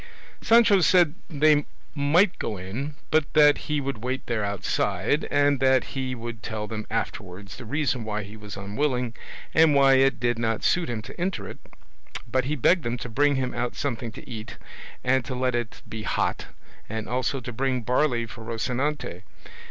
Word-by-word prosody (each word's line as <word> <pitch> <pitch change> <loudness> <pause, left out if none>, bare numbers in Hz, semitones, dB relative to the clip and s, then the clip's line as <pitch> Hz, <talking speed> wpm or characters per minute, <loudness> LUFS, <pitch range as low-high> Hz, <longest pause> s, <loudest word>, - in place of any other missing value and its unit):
Sancho 225 -3 +6
said 175 -3 +5 0.2
they 150 -1 +4 0.3
might 160 +7 +3
go 105 - -3
in, 120 +11 -5 0.2
but 155 -2 +2
that 150 -1 +6
he 150 -1 +1
would 135 -5 -4
wait 130 +1 -2
there 115 -3 -1
outside, 100 - 0
and 145 -1 +3
that 130 -1 +4
he 130 -2 -2
would 115 -1 -7
tell 110 -2 -4
them 110 0 -6
afterwards 100 -3 -4
the 125 - -9
reason 135 -1 -1
why 105 -1 -3
he 100 +2 -10
was 105 -2 -9
unwilling, 125 +4 -1 0.4
and 160 -2 +5
why 135 -1 +6
it 135 -1 +4
did 120 -1 0
not 115 -2 -1
suit 175 -5 +2
him 110 -3 -3
to 170 - -9
enter 185 +2 -2
it; - - -9 0.7
but 130 +2 0
he 150 +3 -1
begged 170 +6 +3
them 120 -2 -2
to 120 - -6
bring 145 +5 +3
him 130 -1 -1
out 120 0 -2
something 120 -4 -3
to - - -12
eat, 110 -2 -7 0.5
and 130 0 +2
to 130 0 -5
let 125 0 0
it 120 -1 -3
be 110 - -6
hot, - - -1 0.4
and 110 0 -4
also 130 +3 -1
to 125 0 -7
bring 130 +1 0
barley 125 -1 +1
for 115 0 -10
Rocinante. 120 - -2
125 Hz, 185 wpm, -25 LUFS, 110-145 Hz, 0.7 s, Sancho